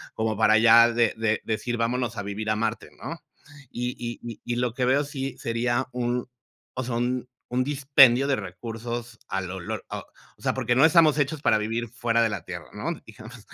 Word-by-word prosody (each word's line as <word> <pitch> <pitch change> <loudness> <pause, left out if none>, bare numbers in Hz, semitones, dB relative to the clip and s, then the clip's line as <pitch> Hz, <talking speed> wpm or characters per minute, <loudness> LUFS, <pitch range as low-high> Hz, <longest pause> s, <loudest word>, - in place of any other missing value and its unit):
como 110 -1 -1
para 110 0 +5
ya 115 +1 +7
de 115 -1 +2
de 110 -1 0
decir 120 +2 -2
vámonos 115 0 -1
a 100 - -3
vivir 105 +2 -4
a 110 - +2
Marte, 115 +1 -2
¿no? - - -6 0.5
Y 125 +1 -3 0.3
y 115 -2 -8
y 120 - -2
lo 120 -2 0
que 125 -1 0
veo 135 +3 +3
sí 135 -1 -5
sería 120 +2 -1
un, 125 0 -2 0.4
o 130 - -3
sea, 120 -1 -3
un 125 +1 -1 0.2
un 125 +1 +1
dispendio 135 -2 +5
de 140 - +2
recursos 115 +5 -6
al 95 -2 -3
olor, 95 -2 -5
o - - -6 0.4
sea, - - 0
porque 120 -2 0
no 135 +5 +6
estamos 160 -3 +5
hechos 145 +1 0
para 110 - +4
vivir 115 +2 -2
fuera 115 -1 0
de 115 - +3
la 100 -6 -4
Tierra, 85 -3 -7
¿no?, 105 +11 -3 0.2
digamos, 110 +1 -12
120 Hz, 195 wpm, -25 LUFS, 110-125 Hz, 0.5 s, ya